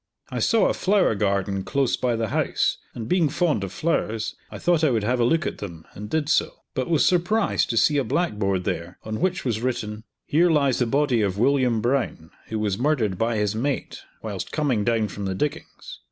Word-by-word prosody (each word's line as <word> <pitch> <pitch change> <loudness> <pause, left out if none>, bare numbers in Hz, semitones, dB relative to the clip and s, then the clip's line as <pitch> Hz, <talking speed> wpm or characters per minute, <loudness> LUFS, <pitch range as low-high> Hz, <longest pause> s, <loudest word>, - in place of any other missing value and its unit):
I - - -2
saw 225 -1 +3
a - - +1
flower 195 - +2
garden 100 -1 0
close 135 +2 +1
by 125 -2 0
the 115 -1 -2
house, - - 0 0.2
and 115 -2 -5
being 175 -4 +2
fond 155 - +1
of 95 - -4
flowers, 110 - -1
I - - -8
thought 170 -2 +2
I 155 - +5
would 115 -5 0
have 125 +4 +1
a - - +3
look 160 +7 +2
at - - -4
them, 85 -6 -8
and 105 +1 -8
did 155 +2 0
so; 155 - 0
but 130 +1 -2
was 160 -3 +3
surprised 185 +5 +2
to 115 - -1
see 145 +5 +4
a 140 - +2
blackboard 105 - 0
there, 85 +1 -4
on 110 0 -4
which 185 -2 0
was 115 -3 -1
written 110 -4 -3 0.2
"Here 170 +4 +3
lies 140 -5 +2
the 125 - +2
body 135 -2 +2
of 100 -2 0
William 125 -1 +2
Brown, 120 -10 -1 0.2
who 110 - -3
was 105 -1 -1
murdered 120 -9 +1
by 115 +1 +1
his 105 -1 0
mate 130 +5 -2 0.2
whilst - - -5
coming 135 -9 0
down 115 -1 +1
from 100 0 -6
the 95 -1 -2
diggings. 160 - -5
120 Hz, 210 wpm, -24 LUFS, 105-150 Hz, 0.2 s, I